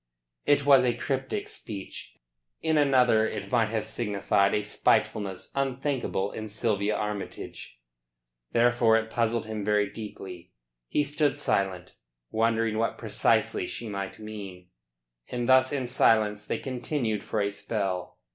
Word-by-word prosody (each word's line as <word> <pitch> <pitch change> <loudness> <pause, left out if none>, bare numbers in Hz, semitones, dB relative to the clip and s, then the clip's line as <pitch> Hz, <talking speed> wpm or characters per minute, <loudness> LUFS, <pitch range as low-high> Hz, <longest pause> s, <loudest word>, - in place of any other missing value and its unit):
It 145 -1 +4
was 135 -2 +7
a 120 -1 +2
cryptic 135 +9 -2
speech. 100 -3 -7 0.4
In 160 -1 +1
another 125 -6 +4
it 100 -2 -5
might 115 -3 +3
have 110 -1 -1
signified 100 -2 +1
a 105 - 0
spitefulness 100 -2 0
unthinkable 135 -6 -1
in 110 0 -6
Sylvia 105 -1 0
Armytage; 105 -11 -5 0.7
therefore 120 -1 +4
it 110 0 -3
puzzled 115 -1 0
him 110 -1 -4
very 105 -1 +2
deeply. 95 -5 -9 0.3
He 150 - +1
stood 145 0 +1
silent, 95 -9 -1 0.4
wondering 115 -1 +1
what 115 - 0
precisely - - +1
she 115 - -5
might 100 -1 -4
mean, 100 -4 -8 0.6
and 120 -1 -3
thus 130 0 +5
in 135 -3 -1
silence 105 -3 +3
they - - -1
continued 125 -4 -2
for 110 - -2
a 100 0 +1
spell. 100 -3 -3
110 Hz, 135 wpm, -27 LUFS, 100-125 Hz, 0.7 s, was